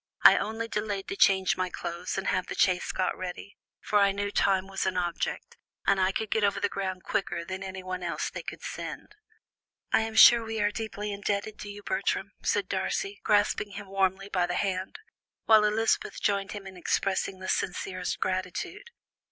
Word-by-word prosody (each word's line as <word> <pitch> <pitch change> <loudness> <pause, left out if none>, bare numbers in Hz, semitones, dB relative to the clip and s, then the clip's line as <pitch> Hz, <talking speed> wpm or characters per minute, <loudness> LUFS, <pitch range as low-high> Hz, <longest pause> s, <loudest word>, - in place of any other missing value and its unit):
I - - +10
only 225 +1 -2
delayed 210 -3 -3
to 390 - -3
change 190 - +4
my 185 0 -1
clothes 175 +1 -4
and 195 - -2
have 185 - 0
the - - -5
chaise 180 -1 +2
got 185 -1 0
ready, 185 +2 -7 0.3
for 210 - +2
I 200 -1 +5
knew 205 +1 -2
time 195 -2 +2
was 195 0 -2
an 185 -1 -1
object, 175 -1 -2 0.3
and 195 -1 +3
I 185 +1 +3
could 220 +2 -3
get 220 - +2
over 200 - +2
the - - +2
ground 190 -2 -4
quicker 175 -3 -2
than 185 +2 -5
anyone 185 -1 -5
else 175 -1 -2
they - - -5
could - - -8
send." - - -6 0.8
"I - - +6
am 220 0 -4
sure 230 +1 +9
we 225 0 -4
are 205 0 +2
deeply 210 -1 -4
indebted 200 +1 -2
to 205 - -7
you, 205 0 -9
Bertram," - - -1
said - - 0
Darcy, 400 0 -2
grasping 205 -1 +2
him 200 -1 -8
warmly 195 0 0
by 180 -3 +1
the 175 - -2
hand, 190 -1 -2 0.5
while 220 -1 +7
Elizabeth 220 +2 +1
joined 200 -1 0
him 205 -2 -7
in 190 -1 -9
expressing 190 +2 0
the 185 0 -7
sincerest 185 0 -2
gratitude. 185 - -3
195 Hz, 190 wpm, -28 LUFS, 185-210 Hz, 0.8 s, I